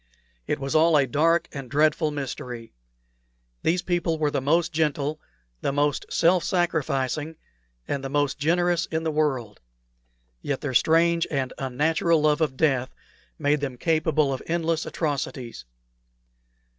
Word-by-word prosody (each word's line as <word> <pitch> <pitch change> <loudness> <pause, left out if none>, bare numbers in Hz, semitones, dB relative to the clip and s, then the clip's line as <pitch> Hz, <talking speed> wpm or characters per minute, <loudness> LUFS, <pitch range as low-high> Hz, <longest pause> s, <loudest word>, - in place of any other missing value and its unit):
It - - 0
was 135 -1 -4
all 160 0 +5
a 140 - +4
dark 160 +6 +2
and 135 -3 -7
dreadful 155 +2 +2
mystery. 125 -5 -6 0.9
These 175 +2 +1
people 175 -2 0
were 150 -2 0
the 140 - -1
most 165 +5 +1
gentle, 155 -1 -1 0.4
the - - 0
most 145 0 0
self 170 +1 +3
sacrificing, 155 -4 -1 0.5
and 140 - -2
the 135 - -4
most 145 0 0
generous 170 +2 +1
in 160 0 -2
the 160 - 0
world; 135 -8 -1 0.8
yet 140 -2 -3
their 140 -3 -3
strange 165 +5 +3
and 135 -4 -2
unnatural 155 +5 +1
love 150 +1 +2
of 140 -4 0
death 135 -4 +1 0.4
made 145 -1 +1
them 135 -3 -4
capable 155 -2 +1
of 130 - -5
endless 165 -1 -1
atrocities. 135 - -4
150 Hz, 140 wpm, -25 LUFS, 135-165 Hz, 0.9 s, all